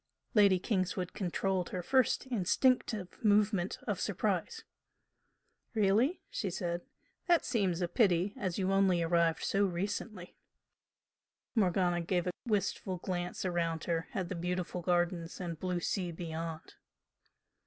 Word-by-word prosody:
Lady 200 -3 +6
Kingswood 185 -2 -1
controlled 190 0 -1
her 180 -1 -4
first 260 +5 +2
instinctive 225 -2 +1
movement 205 -3 +3
of - - -1
surprise. - - -1 1.1
"Really?" 220 - +2
she 200 - -2
said 175 -1 -2 0.5
"That 345 -2 +4
seems 195 -8 0
a 175 - +1
pity 190 -1 +2
as 185 -4 -3
you 190 -1 +1
only 190 -3 +3
arrived 165 -1 +2
so 200 +1 +2
recently 190 +1 -3 0.6
" - - -61
Morgana 180 -4 +2
gave 175 +1 0
a 180 - 0 0.2
wistful 200 -3 -1
glance 180 +1 -3
round 170 -3 -1
her 165 -1 -1
at 185 -3 -1
the - - -4
beautiful 180 +1 -2
gardens 175 -1 0
and 170 -4 -4
blue 180 0 -1
sea 180 0 -1
beyond. 165 -1 -6
180 Hz, 130 wpm, -32 LUFS, 175-200 Hz, 1.1 s, Lady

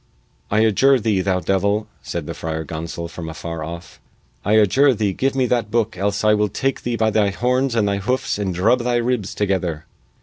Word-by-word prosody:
"I 105 +2 +2
adjure 130 +5 +4
thee, 105 -4 +1
thou 95 -1 0
devil," 100 +4 +1 0.2
said - - -5
the - - -5
Friar 80 0 -4
Gonsol 85 +2 -5
from 85 -1 -7
afar 80 0 -6
off, 85 +2 -8 0.4
"I 105 - +1
adjure 120 +6 +4
thee 105 -3 0
give 135 +7 0
me 130 -1 +2
that 120 -3 0
booke 115 -2 0
else 100 +2 -1
I 105 0 +5
will 105 0 +1
take 135 +7 -1
thee 120 -1 -2
by 110 -1 +1
thy 105 -1 +2
horns 125 +4 0
and 110 -3 +2
hoofs 100 +4 -1
and 100 -2 -1
drub 95 +8 +2
thy 120 0 0
ribs 120 -4 -1
together!" 90 -6 -1
105 Hz, 200 wpm, -21 LUFS, 90-120 Hz, 0.4 s, I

